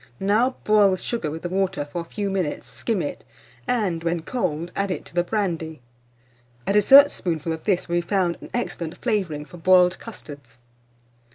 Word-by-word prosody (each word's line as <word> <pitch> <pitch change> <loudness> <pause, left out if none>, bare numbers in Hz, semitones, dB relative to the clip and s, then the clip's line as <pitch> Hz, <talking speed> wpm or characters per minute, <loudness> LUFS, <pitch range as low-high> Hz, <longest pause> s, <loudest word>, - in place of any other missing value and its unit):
Now 220 +6 +2
boil 210 -2 +5
the 185 - 0
sugar 205 -5 -3
with 160 +2 -7
the 175 - -3
water 190 -4 -1
for 160 +4 -5
a - - -9
few 200 +3 -3
minutes, 185 -6 -2
skim 220 -6 -2
it, 145 - -5 0.4
and, 190 -9 0
when 170 -1 -1
cold, 170 -7 -2
add 200 0 -1
it 185 - -4
to - - -15
the 175 - +2
brandy. 170 -6 -2 0.9
A - - +1
dessertspoonful 205 - +5
of 160 - -8
this 190 -4 +1
will 175 0 0
be - - +2
found 175 -1 0
an - - -10
excellent 175 -9 -4
flavouring 185 -11 -1
for 175 - -13
boiled 180 +1 +4
custards. 140 - -10
180 Hz, 180 wpm, -23 LUFS, 165-205 Hz, 0.9 s, boil